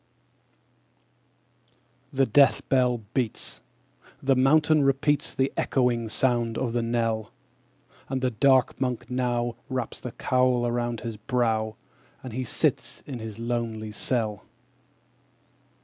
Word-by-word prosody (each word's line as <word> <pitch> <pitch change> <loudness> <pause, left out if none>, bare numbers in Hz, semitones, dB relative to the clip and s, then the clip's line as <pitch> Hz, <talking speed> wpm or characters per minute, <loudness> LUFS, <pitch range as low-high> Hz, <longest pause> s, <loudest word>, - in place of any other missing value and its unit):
The 135 -1 +2
death 140 +4 +4
bell 125 -3 +2
beats! 125 -5 -3 0.6
The 135 0 +2
mountain 150 +4 +4
repeats 140 +1 +1
The 135 +1 +1
echoing 120 -3 +1
sound 120 -1 +1
of 120 -3 -1
the 120 - +1
knell; 115 -2 -1 0.8
And 130 -1 -2
the 130 -1 +1
dark 130 +2 +3
Monk 125 -2 -2
now 120 -2 -1
Wraps 130 -3 -3
the 125 - -6
cowl 125 -1 +2
round 120 -1 -2
his 115 -3 -5
brow, 110 -2 0 0.5
_5 130 - -6
As - - -9
he 130 +3 -3
sits 125 - -1
in 130 -4 -6
his 110 -2 -7
lonely 115 -2 -3
cell. 110 -2 -2
120 Hz, 120 wpm, -26 LUFS, 115-130 Hz, 0.8 s, death